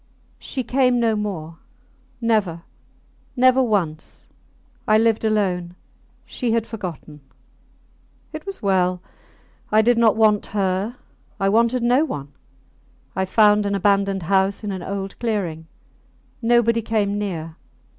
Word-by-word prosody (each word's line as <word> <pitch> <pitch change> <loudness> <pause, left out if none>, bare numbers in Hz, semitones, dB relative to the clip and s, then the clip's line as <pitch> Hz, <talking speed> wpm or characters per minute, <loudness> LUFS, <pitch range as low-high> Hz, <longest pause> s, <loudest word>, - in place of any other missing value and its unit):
She 260 - -4
came 250 0 +2
no 225 -2 +2
more. 170 -6 -5 0.6
Never! 205 -8 0 0.7
Never 255 +1 +4
once! 185 -10 -2 0.6
I 215 - +5
lived 225 0 +2
alone. 185 -5 0 0.5
She 240 -4 -2
had 230 -1 +1
forgotten. 170 - -8 1.1
It 310 - -6
was 390 - -6
well. 185 -2 +1 0.7
I 215 +1 +5
did 240 +1 +3
not 225 -3 +4
want 215 -2 +3
her; 195 +4 0 0.4
I 195 - +2
wanted 235 +3 +2
no 250 +5 +3
one. 145 - -5 0.8
I 190 +1 0
found 210 +1 +4
an 200 - -1
abandoned 195 -1 +1
house 195 +4 +1
in 205 - -3
an 190 -2 -5
old 195 +1 -5
clearing. 180 -9 -3 0.7
Nobody 230 0 +3
came 205 -2 -1
near. 165 -6 -4
205 Hz, 125 wpm, -21 LUFS, 185-230 Hz, 1.1 s, I